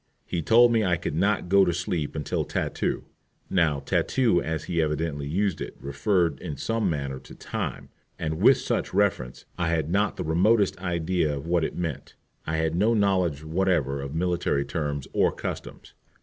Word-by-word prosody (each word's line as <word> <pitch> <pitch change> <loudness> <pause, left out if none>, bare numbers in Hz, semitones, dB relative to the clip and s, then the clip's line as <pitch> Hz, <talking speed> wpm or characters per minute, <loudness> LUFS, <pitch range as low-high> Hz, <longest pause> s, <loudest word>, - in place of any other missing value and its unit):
He 85 - -2
told 120 +7 +6
me 115 -2 +3
I 90 -3 +2
could 80 - -4
not 100 +4 +1
go 100 +2 +5
to 90 - +2
sleep 85 -3 -2
till 75 - -1
"tattoo." - - -2 0.5
Now 80 -6 +2
tattoo, 110 - +2
as 80 -1 -3
he 85 -2 0
evidently 75 -2 -2
used 95 +3 0
it, - - -6
referred 70 - 0
in 75 -6 -6
some 115 +6 0
manner 70 -4 -3
to - - -14
time, - - -5 0.3
and 80 -1 -3
with - - +7
such - - -2
reference 95 -12 0
I 85 - +1
had 80 -1 0
not 100 +3 +1
the - - -2
remotest 95 +6 +3
idea 85 -4 0
of 70 - -7
what 85 -1 +1
it - - -2
meant. 80 -6 -4 0.3
I 80 0 0
had 80 0 0
no 105 +7 +2
knowledge 95 -8 +1
whatever 80 -5 0
of 70 +2 -6
military 85 -5 0
terms 75 -4 -3
or - - +3
customs. - - -7
85 Hz, 180 wpm, -26 LUFS, 75-95 Hz, 0.5 s, with